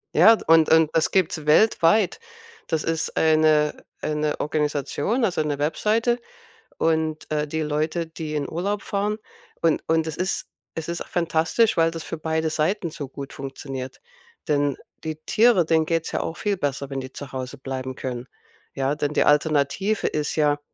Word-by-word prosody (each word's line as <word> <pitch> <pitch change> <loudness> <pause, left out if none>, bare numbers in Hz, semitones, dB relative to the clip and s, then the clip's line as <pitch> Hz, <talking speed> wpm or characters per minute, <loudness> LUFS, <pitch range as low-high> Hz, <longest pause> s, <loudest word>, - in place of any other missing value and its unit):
Ja, 225 0 +8
und 165 -1 +5
und 160 -1 +5
das 160 - +3
gibt's 165 -5 +1
weltweit. 190 +2 +4 0.5
Das 160 -1 -1
ist 165 -1 -2
eine 155 -1 +3 0.2
eine 150 0 -1
Organisation, 150 - 0
also, 175 -4 0
eine 150 -2 -1
Webseite 225 +10 +1 0.6
und, 160 -1 0
äh, 150 0 0
die 160 +1 -2
Leute, 155 +3 -1
die 160 -1 -6
in 145 -1 -1
Urlaub 195 +5 -2
fahren 210 +1 -1 0.4
und 165 -2 +2
und 160 0 +3
es 160 - -4
ist 185 +2 -1 0.3
es 160 0 -4
ist 170 0 -3
fantastisch, 170 +6 +1
weil 165 0 +4
das 165 -1 -6
für 165 - -5
beide 160 0 -1
Seiten 170 +2 0
so 145 -3 -6
gut 140 0 -8
funktioniert. 135 -1 -7 0.5
Denn 145 -2 +1 0.3
die 155 -1 -3
Tiere, 220 -6 +4
denen 160 -1 +2
geht's 165 -1 -1
ja - - -1
auch 165 - -4
viel 205 -2 -1
besser, 140 -2 -2
wenn 135 - -2
die 130 +1 -8
zu 140 -2 -9
Hause 130 +1 -5
bleiben 130 -1 -5
können. 125 -1 -5 0.5
Ja, 135 +1 0
denn 150 0 -2
die - - +3
Alternative 150 +7 +2
ist 150 -1 -2
ja, 145 -1 +2
155 Hz, 170 wpm, -24 LUFS, 145-170 Hz, 0.6 s, Ja